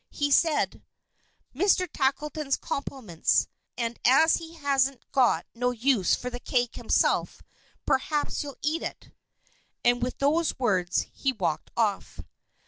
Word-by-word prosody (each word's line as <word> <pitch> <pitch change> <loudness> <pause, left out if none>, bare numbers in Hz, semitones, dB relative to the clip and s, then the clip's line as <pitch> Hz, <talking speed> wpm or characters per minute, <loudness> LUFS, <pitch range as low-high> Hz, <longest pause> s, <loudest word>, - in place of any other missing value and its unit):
He 290 0 -2
said: 315 +1 +2 0.7
"Mr. 365 +4 +2
Tackleton's 295 0 -1
compliments, 245 - -1 0.3
and 235 -1 -3
as 295 +6 +5
he 330 0 -10
hasn't 275 -4 0
got 255 -3 +3
no 245 +1 0
use 245 -4 +2
for 250 - -6
the 245 - -6
cake 245 -1 -1
himself, - - 0 0.4
perhaps 295 +3 0
you'll 280 -3 -7
eat 310 +3 0
it." - - -7 0.7
And 245 0 +3
with 250 +1 -2
these 310 +3 +1
words, 185 -8 +1
he 270 - 0
walked 180 -9 -2
off. 210 -4 -1
265 Hz, 130 wpm, -27 LUFS, 240-295 Hz, 0.7 s, as